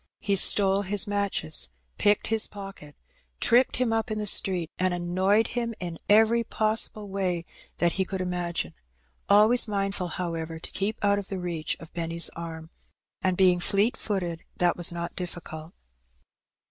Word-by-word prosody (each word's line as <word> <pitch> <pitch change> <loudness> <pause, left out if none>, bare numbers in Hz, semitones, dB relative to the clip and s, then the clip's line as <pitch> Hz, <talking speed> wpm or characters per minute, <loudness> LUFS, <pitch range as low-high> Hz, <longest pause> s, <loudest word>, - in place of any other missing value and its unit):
He 200 - -1
stole 195 0 +5
his 205 0 +3
matches, 200 - 0 0.3
picked 205 0 +2
his 225 -1 +3
pocket, 195 -8 -11 0.4
tripped 245 +2 +3
him 245 -2 0
up 225 +1 -1
in 215 - -3
the 210 - -3
street, 180 -4 +2
and 185 -1 +1
annoyed 190 +5 +1
him 235 -2 -3
in 170 -2 -6
every 225 +3 +4
possible 215 -1 +1
way 185 -3 -2 0.3
that 175 -1 +2
he 190 - -1
could 190 0 -5
imagine, 175 - -3 0.6
always 215 +4 +5
mindfiil, 195 -4 -2
however, 165 -2 -4
to 160 - -7
keep 200 +3 -2
out 200 0 +3
of 200 - -8
the 195 - -4
reach 170 -4 -3
of 165 - -13
Benny's 170 0 +1
arm; 165 -1 -8 0.5
and, 185 -1 0
being 180 -2 +4
fleet 200 +6 +1
footed, 175 -5 -4
that 175 -1 +2
was 175 -1 +3
not 170 0 -6
difficult. 165 -3 -7
190 Hz, 160 wpm, -26 LUFS, 170-205 Hz, 0.6 s, stole